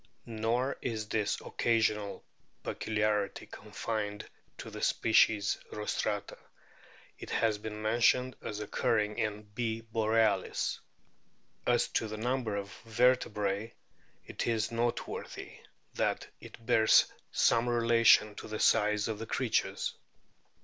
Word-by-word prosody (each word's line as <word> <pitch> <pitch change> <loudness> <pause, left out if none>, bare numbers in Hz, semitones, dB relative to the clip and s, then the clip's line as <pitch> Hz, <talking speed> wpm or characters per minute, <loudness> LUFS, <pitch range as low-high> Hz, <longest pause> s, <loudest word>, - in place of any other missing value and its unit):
Nor 115 +4 -1
is 110 -3 -3
this 105 -1 0
occasional 110 -3 0 0.4
peculiarity 105 -2 -1
confined 105 -2 -5 0.3
to - - -8
the - - -7
species 105 -2 +3
Rostrata. 105 -1 -3 0.8
It - - -8
has 110 -2 +1
been 105 0 -6
mentioned 120 +3 +3
as 105 - -5
occurring 105 +1 0
in 105 -1 -2
B. 110 +2 -3
borcalis. 110 -3 +1 0.9
As - - +3
to 110 - -1
the 110 0 -6
number 120 -1 -1
of 100 -1 -5
vertebrae, 110 -3 +1 0.5
it - - -4
is 115 -1 0
noteworthy 115 +1 -3 0.3
that - - -1
it 115 - -13
bears 110 -2 +5 0.3
some 115 +1 +3
relation 115 -2 +5
to - - -7
the 110 0 -5
size 105 0 +3
of 110 -2 -3
the 115 - -6
creatures. - - -1
110 Hz, 115 wpm, -31 LUFS, 105-115 Hz, 0.9 s, bears